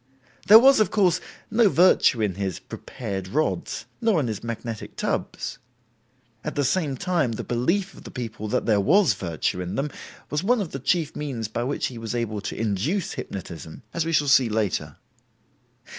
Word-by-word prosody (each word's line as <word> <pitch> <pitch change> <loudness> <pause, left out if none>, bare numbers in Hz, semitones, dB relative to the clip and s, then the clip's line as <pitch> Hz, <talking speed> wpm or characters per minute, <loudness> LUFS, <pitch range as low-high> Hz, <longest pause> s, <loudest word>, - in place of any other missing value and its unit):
There 215 - +11
was, 270 +3 +7
of 215 - +3
course, 180 -4 +2 0.3
no 225 -2 +5
virtue 155 -7 +4
in 100 -3 0
his 95 -1 -3
"prepared" 100 -7 -6
rods, 155 - -1 0.2
nor 225 -7 +3
in 140 - 0
his 110 -3 -4
magnetic 115 -1 -5
tubs. - - -3 0.8
At - - -4
the 145 - +1
same 140 -1 0
time 160 -7 0
the - - -4
belief 175 +12 0
of - - -14
the - - -9
people 110 -4 -5
that - - 0
there 105 -3 +3
was 165 - +4
virtue 90 -1 -2
in 90 0 -4
them 140 +2 -1 0.4
was 150 +1 0
one 240 +4 +3
of 190 -6 -3
the 135 - -5
chief 155 +3 0
means 130 -7 -3
by 120 +2 -2
which 135 +4 -1
he 120 -3 -5
was 115 +1 -4
able 110 -3 -2
to - - -5
induce 115 - -1
hypnotism, 85 -1 -7
as 170 - 0
we 165 - -2
shall 145 -2 +2
see 130 -3 +5
later. 105 -3 -1
130 Hz, 185 wpm, -24 LUFS, 110-170 Hz, 0.8 s, There